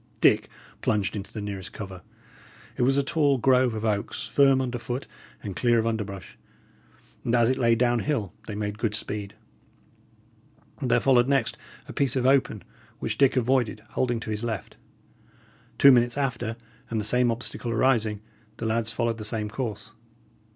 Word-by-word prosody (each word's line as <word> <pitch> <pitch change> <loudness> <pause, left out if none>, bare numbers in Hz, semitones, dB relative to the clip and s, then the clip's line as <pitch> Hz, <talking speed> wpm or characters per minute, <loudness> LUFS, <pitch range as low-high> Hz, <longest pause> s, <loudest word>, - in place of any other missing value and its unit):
Dick - - +4 0.3
plunged 100 -2 0
into 100 -1 -6
the 110 - -6
nearest 100 -2 -6
cover. 95 -3 -8 0.7
It - - -3
was 135 +3 +3
a 140 - +3
tall 145 -2 +2
grove 125 -1 +3
of 110 +1 -3
oaks, 105 -2 -2
firm 135 -2 +4
under 125 -2 -2
foot 125 +3 -4 0.4
and 100 -3 -5
clear 120 +2 +3
of 115 - +1
underbrush, 105 -5 -4 0.8
and 120 - +1
as 120 0 +4
it 130 - -1
lay 115 -2 +4
down 120 0 +2
hill, 115 - -2
they 105 - -5
made 105 0 -4
good 110 -3 0
speed. 105 -2 -5 1.5
There 125 -2 +3
followed 125 -2 +4
next 135 -4 +1 0.3
a - - -8
piece 140 -3 0
of 130 -1 0
open, 130 -6 +2 0.3
which 110 -2 -3
Dick 135 -1 +4
avoided, 120 -4 +1
holding 120 -2 0
to 110 - -5
his 105 +1 -3
left. 110 -5 -4 1.0
Two 140 - +8
minutes 120 0 +3
after, 120 -4 -2 0.3
and 115 - -1
the 105 - -1
same 125 +2 +3
obstacle 120 +1 -1
arising, 110 -3 +1 0.4
the 115 - -5
lads 110 0 0
followed 115 0 -1
the - - -5
same 105 -1 -2
course. 115 -3 -5
115 Hz, 170 wpm, -26 LUFS, 105-130 Hz, 1.5 s, Two